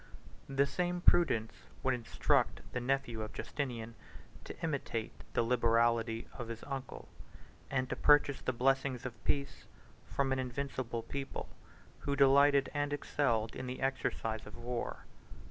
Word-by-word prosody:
The 135 +1 +3
same 175 +4 -1
prudence 125 -12 +4 0.3
would 130 - +3
instruct 120 -2 +1
the 125 - 0
nephew 120 -3 -1
of 110 - -5
Justinian 120 -5 -4 0.5
to - - -8
imitate 140 -8 -2 0.2
the - - +4
liberality 115 -1 +2
of 120 - -6
his 115 0 -6
uncle, 135 -2 -6 0.6
and 130 0 0
to - - -2
purchase 145 -2 +4
the - - 0
blessings 130 0 +1
of 115 -5 -7
peace 140 -1 -1 0.4
from 135 -1 0
an 130 - +1
invincible 130 -2 -3
people, 140 +2 -5 0.5
who 140 - -1
delighted 140 0 +5
and 145 0 0
excelled 120 -6 0
in 130 - -5
the 125 - -4
exercise 115 -5 -1
of 105 - -10
war. 120 0 -4
130 Hz, 140 wpm, -34 LUFS, 115-140 Hz, 0.6 s, delighted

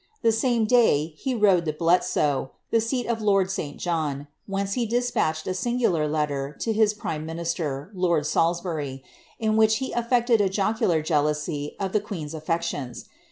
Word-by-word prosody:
The 230 - +5
same 230 0 +1
day, 190 -10 +3
he 255 - -2
rode 195 -6 +4
to 155 - -1
Bietsoe, 155 -4 +1 0.2
the 230 - +3
seat 245 +2 -1
of 230 -1 -2
lord 195 -3 +2
St. 145 -6 -4
John, 155 -5 -2 0.2
whence 195 0 -2
he 235 0 0
despatched 230 -10 0
a 185 - -1
singular 185 -6 +1
letter 150 -2 -2
to 225 - 0
his 215 -1 +3
prime 155 -7 -4
minister, 165 -1 -3
lord 170 -5 +1
Salisbury, 160 -4 -1 0.3
in 220 -1 +1
which 220 0 +5
he 265 - -4
affected 240 -1 +2
a 195 - +2
Jocular 195 -5 +1
jealousy 150 -1 -1
of 195 -2 -2
the 215 - +2
queen's 165 -7 -6
aflectioiis. 155 -5 -3
180 Hz, 160 wpm, -25 LUFS, 155-220 Hz, 0.3 s, The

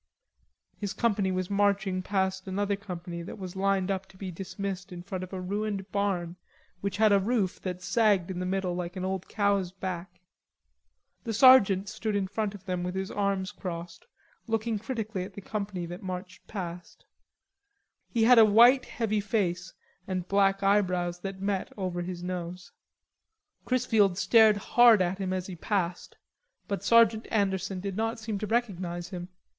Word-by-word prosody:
His 205 -1 -3
company 205 -5 +1
was 185 +1 -2
marching 200 -2 +1
past 190 0 -1
another 200 +1 0
company 175 -3 -7
that 170 - -8
was 185 -2 -7
lined 195 0 +1
up 190 0 -3
to 190 - -19
be 185 -1 -5
dismissed 190 +1 -5
in 175 -1 -8
front 185 0 -5
of 185 - -8
a 190 - -4
ruined 200 +1 -3
barn 185 -4 -1 0.4
which 200 +1 -3
had 215 0 +5
a 200 - +5
roof 205 -2 0
that 180 -1 -5
sagged 205 -4 +2
in 180 - -4
the 180 - -2
middle 190 -1 -1
like 175 +1 -4
an 185 0 -3
old 190 -1 -3
cow's 200 -4 +1
back. 180 -1 -6 1.0
The 225 -3 -3
sergeant 205 -6 +6
stood 215 0 -3
in 200 -1 +1
front 205 +1 -3
of 195 -1 -13
them 180 -1 -2
with 180 +1 -3
his 190 0 -3
arms 200 -1 -1
crossed, 175 -3 -7 0.4
looking 225 -1 -1
critically 220 -4 -4
at 190 +1 -10
the 200 - -7
company 200 -3 -4
that 175 +2 -8
marched 185 0 -7
past. 175 -4 -7 1.0
He 230 -2 +1
had 240 +1 +7
a - - +10
white 235 +5 +6
heavy 215 -2 -1
face 185 -4 -1 0.4
and 185 -2 -3
black 195 0 +2
eyebrows 180 -3 +1
that 195 +1 -6
met 195 -1 -1
over 180 -3 -2
his 175 0 -5
nose. 180 0 -5 0.9
Chrisfield 220 -7 +2
stared 220 +1 +5
hard 235 +1 +6
at 185 +1 0
him 190 -1 -2
as 185 -1 -2
he 185 - -7
passed, 180 0 -2 0.5
but 200 -2 -3
Sergeant 230 0 +4
Anderson 195 -3 0
did 195 0 -4
not 225 +2 -1
seem 215 -2 -4
to 210 - -3
recognize 185 -7 -2
him. 180 -2 -6
195 Hz, 170 wpm, -28 LUFS, 180-205 Hz, 1.0 s, a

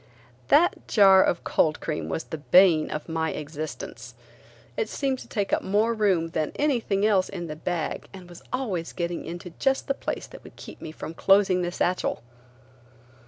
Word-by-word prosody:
That 345 +4 +3
jar 195 -3 +6
of 170 - 0
cold 155 0 +1
cream 155 -2 -4
was 160 - -2
the 160 - -7
bane 170 0 +5
of 150 - -5
my 160 -1 -1
existence. 155 +1 -7 0.6
It 460 - -2
seemed 270 -2 -1
to - - -11
take 205 -3 -2
up - - +2
more 215 +4 +1
room 190 -7 +1
than 155 -2 -2
everything 235 -9 +1
else 195 -4 +3
in 175 -3 -5
the 155 -2 -6
bag 165 +1 -3
and 185 -2 -11
was 175 -1 -13
always 200 -11 -3
getting 170 -1 -3
into 175 +1 -7
just 270 0 +1
the 275 - +1
place - - -4
that - - -13
would - - -14
keep - - -11
me 155 - -7
from 160 - -7
closing 195 0 +3
the 175 0 -2
satchel. 180 -6 -1
180 Hz, 180 wpm, -25 LUFS, 165-205 Hz, 0.6 s, jar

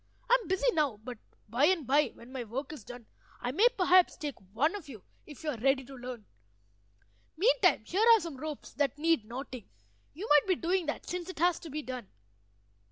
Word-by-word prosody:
"I - - +9
am - - -11
busy 380 +7 +2
now, 290 -8 +1
but 245 -2 -7 0.3
by 240 +6 +2
and 340 -4 +2
by, 285 +3 +3
when 235 +2 -14
my 260 -2 -4
work 265 +7 -5
is 280 -8 -10
done, 245 0 -10 0.3
I 245 - -2
may 410 - +5
perhaps 365 -1 +4
take 295 -2 -4 0.2
one 295 - +1
of 350 -8 -8
you 220 -8 -10 0.2
if 295 0 -11
you 305 - -1
are 250 - -5
ready 270 +2 +2
to 270 - -12
learn. 250 -4 -8 1.1
Meantime - - +3
here 415 +6 +2
are - - +2
some 330 -7 -6
ropes 305 +1 -7
that 285 -2 0
need 320 -6 +2
knotting; 250 0 -8 0.5
you 390 +8 -6
might 295 +4 +5
be 370 - +3
doing 350 0 0
that, 300 - -4
since 360 0 -4
it 370 - -8
has 350 +2 +2
to 330 - -9
be 305 +1 -4
done." 250 -5 -6
295 Hz, 210 wpm, -30 LUFS, 255-350 Hz, 1.1 s, I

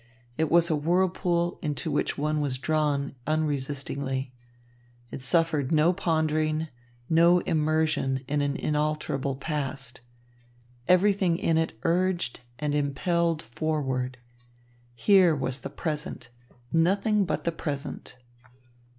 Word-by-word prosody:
It 160 +2 0
was 170 0 +4
a - - +3
whirlpool 175 +2 +1
into 150 -1 -2
which 145 - 0
one 150 +1 0
was 135 -3 -1
drawn 145 -1 0
unresistingly. 140 -3 -2 0.8
It - - -6
suffered 155 -1 +2
no 160 +3 +4
pondering, 155 -3 0 0.4
no 170 +2 +5
immersion 155 -4 0
in 145 0 0
an 140 0 -1
unalterable 150 -2 -1
past. 135 -4 -4 0.9
Everything 185 -1 +3
in 165 - +1
it 160 -7 0
urged 180 -4 0 0.2
and 150 +2 -2
impelled 165 +3 0
forward. 130 -1 -2 0.8
Here 180 - +5
was 130 -1 -2
the - - -6
present, 150 -6 -4 0.4
nothing 195 +5 +3
but 185 - -2
the 170 - 0
present. 145 -5 -5
155 Hz, 110 wpm, -27 LUFS, 140-170 Hz, 0.9 s, no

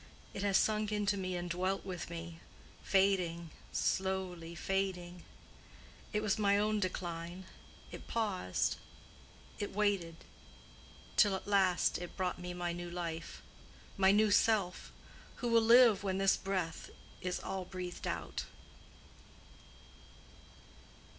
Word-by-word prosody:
It 195 - -4
has 200 -1 +3
sunk 215 -1 +1
into 210 -1 +1
me 185 -2 -3
and 175 0 -3
dwelt 185 +3 -1
with 180 -4 -5
me—fading, 170 +1 -1 0.2
slowly 185 -3 -1
fading: 180 -1 -2 0.9
it 210 0 0
was 210 0 +1
my 200 -1 +4
own 210 +1 +1
decline: 175 -1 -4 0.5
it - - -9
paused—it 195 - -4
waited, 200 -6 +1 1.0
till 205 -3 +6
at - - -6
last 190 -3 +3
it 175 -1 -8
brought 180 -1 -1
me 180 0 -5
my 175 -1 -2
new 175 0 -5
life—my 175 +2 -3
new 210 +1 +4
self—who 205 +3 -1
will 230 -1 +5
live 230 -2 +7
when 190 -1 0
this 195 0 +4
breath 185 -4 -3 0.3
is 180 0 -2
all 190 -1 -4
breathed 180 -1 -6
out." - - -3
190 Hz, 110 wpm, -34 LUFS, 175-200 Hz, 1.0 s, live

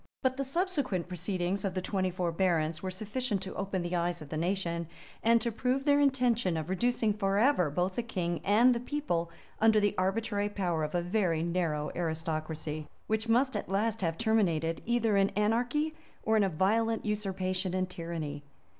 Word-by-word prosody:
But 260 0 +2
the 275 - -1
subsequent 280 - -1
proceedings 180 +1 -2
of 190 -2 -2
the 185 - 0
twenty 185 -2 0
four 180 -1 -1
barons 165 -3 +1
were 190 - -3
sufficient 215 +3 -2
to 190 - -6
open 195 -2 -2
the 175 +1 -2
eyes 175 0 0
of 150 - -10
the 155 - -4
nation, 170 0 -1 0.3
and 230 +1 +5
to 235 - -1
prove 255 +4 -1
their 285 -1 +5
intention 245 - +2
of 160 +1 -4
reducing 225 +2 +1
forever 200 - +2
both 180 +5 0
the - - +2
king 175 -7 -2
and 230 +5 +5
the 235 - -1
people 245 - -2 0.3
under 220 0 +5
the 205 -1 +2
arbitrary 205 +2 0
power 175 -6 -1
of 150 +3 -3
a 175 - +1
very 175 -4 +1
narrow 165 -4 -1
aristocracy., 160 -2 -3 0.2
which 220 +1 -1
must 260 +3 +3
at - - -3
last 215 +3 0
have 165 -2 -1
terminated 170 -8 +1
either 230 -3 +2
in 195 0 +4
anarchy, 245 +9 +1 0.3
or 220 - +2
in 215 - +4
a 195 - +2
violent 220 +7 +1
usurpation 185 -3 -1
and 185 0 0
tyranny. 165 -5 -5
195 Hz, 180 wpm, -30 LUFS, 170-225 Hz, 0.3 s, and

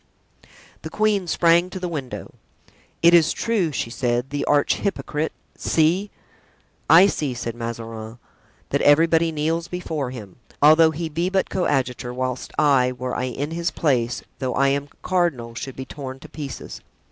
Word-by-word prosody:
The 160 - -6
queen 210 -1 +1
sprang 170 +1 +3
to 185 - -6
the 180 - -3
window. 145 -7 -6 0.7
"It 170 +1 +7
is 165 -2 +6
true," 210 -9 0
she 115 -3 -3
said, 120 +1 -1
"the 145 0 -2
arch 145 -1 +2
hypocrite—see!" 165 +1 -1 0.8
"I 165 +5 +9
see," 150 -9 -1
said 115 -1 -4
Mazarin, 115 -1 -6 0.5
"that - - 0
everybody 165 +2 +4
kneels 160 +2 -1
before 160 -7 -3
him, 110 -7 -10 0.2
although 155 +2 +7
he 165 +1 -4
be 165 +4 -1
but 190 0 0
coadjutor, 130 -8 -1
whilst 130 0 -3
I, 130 -4 +3
were 125 0 -4
I 125 - -1
in 140 +4 -4
his 170 +1 -1
place, 125 -8 0 0.2
though 130 -2 -2
I 140 0 +3
am 140 +1 -1
cardinal, 165 -11 0
should 130 +3 -6
be 130 - -6
torn 130 -1 -7
to - - -12
pieces. 145 -4 -7
145 Hz, 155 wpm, -22 LUFS, 125-170 Hz, 0.8 s, I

